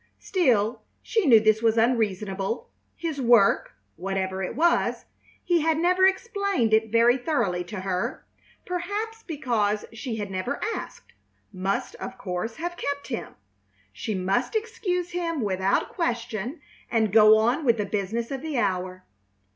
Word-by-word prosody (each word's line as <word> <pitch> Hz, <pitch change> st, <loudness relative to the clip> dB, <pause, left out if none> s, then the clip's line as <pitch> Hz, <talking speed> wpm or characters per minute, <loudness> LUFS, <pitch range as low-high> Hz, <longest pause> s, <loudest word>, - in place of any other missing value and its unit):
Still 245 Hz, -, +1 dB, 0.2 s
she 440 Hz, -8 st, +1 dB
knew 230 Hz, -4 st, +8 dB
this 215 Hz, 0 st, +3 dB
was 230 Hz, -1 st, +2 dB
unreasonable. 210 Hz, -3 st, 0 dB, 0.2 s
His 320 Hz, -5 st, -4 dB
work, 235 Hz, -5 st, +4 dB, 0.2 s
whatever 190 Hz, +1 st, -2 dB
it 185 Hz, -, -3 dB
was 335 Hz, +5 st, +2 dB, 0.4 s
he 345 Hz, -2 st, +2 dB
had 320 Hz, 0 st, +2 dB
never 365 Hz, +3 st, +4 dB
explained 400 Hz, -, 0 dB
it 220 Hz, 0 st, +3 dB
very 235 Hz, +2 st, +5 dB
thoroughly 225 Hz, -, 0 dB
to 190 Hz, +1 st, -6 dB
her, 185 Hz, -1 st, -3 dB, 0.4 s
perhaps 410 Hz, +6 st, -3 dB
because 230 Hz, -, -1 dB
she 230 Hz, +1 st, -5 dB
had 205 Hz, -2 st, -4 dB
never 190 Hz, +9 st, -3 dB
asked -, -, -8 dB, 0.4 s
must, 190 Hz, +1 st, -2 dB
of -, -, -7 dB
course, 185 Hz, +5 st, -4 dB
have 345 Hz, +1 st, -5 dB
kept 285 Hz, 0 st, -4 dB
him. 235 Hz, -, -5 dB, 0.6 s
She 215 Hz, -, -4 dB
must 195 Hz, -, 0 dB
excuse 370 Hz, -6 st, -2 dB
him 335 Hz, -4 st, -2 dB
without 190 Hz, -2 st, 0 dB
question 240 Hz, -, -3 dB, 0.3 s
and 220 Hz, -4 st, +1 dB
go 215 Hz, 0 st, +8 dB
on 240 Hz, +8 st, +1 dB
with 235 Hz, -4 st, +3 dB
the 210 Hz, -, -1 dB
business 215 Hz, +4 st, -2 dB
of 270 Hz, -1 st, -3 dB
the 310 Hz, -3 st, -3 dB
hour. 185 Hz, -3 st, -1 dB
230 Hz, 145 wpm, -25 LUFS, 200-320 Hz, 0.6 s, knew